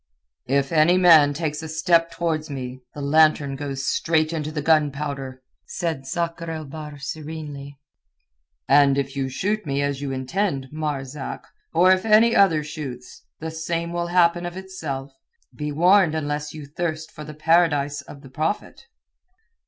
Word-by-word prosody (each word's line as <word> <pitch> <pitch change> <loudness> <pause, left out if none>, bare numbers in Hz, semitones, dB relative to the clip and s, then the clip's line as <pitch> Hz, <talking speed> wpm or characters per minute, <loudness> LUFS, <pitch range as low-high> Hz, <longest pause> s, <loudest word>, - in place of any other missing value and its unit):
"If 135 +1 +1
any 165 +3 +4
man 165 -5 +7
takes 150 0 -3
a 160 - -6
step 165 +1 +2
towards 165 -2 -2
me, 130 -2 -6
the 145 - -6
lantern 150 -1 +3
goes 135 -1 -4
straight 160 -1 +1
into 155 -1 -3
the 150 -2 -4
gunpowder," 140 -4 0 0.2
said 160 -7 -3
Sakr 170 +1 -3
el 160 -1 -5
Bahr 150 +1 -8
serenely. 145 -1 -7 0.9
"And 140 0 +5
if 135 0 -2
you 135 -1 -1
shoot 205 +11 -1
me 140 -2 -1
as 140 -1 -2
you 140 -1 -3
intend, 135 +1 -2
Marzak, 145 -3 -4 0.3
or 180 +3 +5
if 185 0 +3
any 225 +2 +5
other 165 -6 +4
shoots, 145 -5 -8
the 160 0 -5
same 165 +1 -3
will 170 0 -1
happen 175 0 +3
of 175 +1 -5
itself. 150 -8 -6 0.4
Be 150 0 -4
warned 175 +2 +4
unless 150 -1 -3
you 155 -1 -9
thirst 155 +1 -4
for 150 - -9
the 150 0 -9
Paradise 150 -3 +2
of 140 0 -13
the 135 - -12
Prophet." 160 - -3
155 Hz, 155 wpm, -23 LUFS, 140-170 Hz, 0.9 s, man